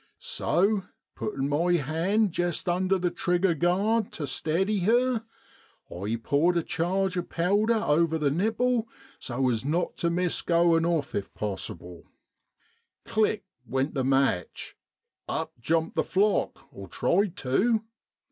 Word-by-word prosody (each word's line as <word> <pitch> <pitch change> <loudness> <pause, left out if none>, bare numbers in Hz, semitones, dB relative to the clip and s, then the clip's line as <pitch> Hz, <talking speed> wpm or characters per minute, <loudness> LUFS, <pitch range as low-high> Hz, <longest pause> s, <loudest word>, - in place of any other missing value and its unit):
So 200 +3 +1 0.3
puttin' 140 -10 -3
rny 170 +5 +2
hand 175 +8 +1
jest 175 0 -2
under 185 +2 +2
the 180 -1 -1
trigger 175 +1 +1
guard 195 +8 +1
tu 150 - -4
steady 175 +9 0
her, 235 +4 +2 0.7
I 100 +6 -2
poured 170 +5 +2
a 170 - +1
charge 185 +4 -1
of 175 - -3
powder 205 +7 +2
over 165 -5 +2
the 150 -3 +1
nipple 225 - +1 0.3
so 130 +1 -1
as 115 -2 0
not 160 +6 -1
tu 170 - 0
miss 175 0 0
goin' 170 -1 +3
ofi 160 -10 0
if 100 - -11
possible. 95 -4 -5 1.0
Click! 215 -2 +1 0.2
went 135 +4 -1
the 135 - -1
match, 135 -9 0 0.5
up - - -3
jumped 160 +6 0
the - - +2
flock, 205 +2 0
or 100 -1 -10
tried 185 - 0
tu. 215 - +1
175 Hz, 135 wpm, -27 LUFS, 145-200 Hz, 1.0 s, goin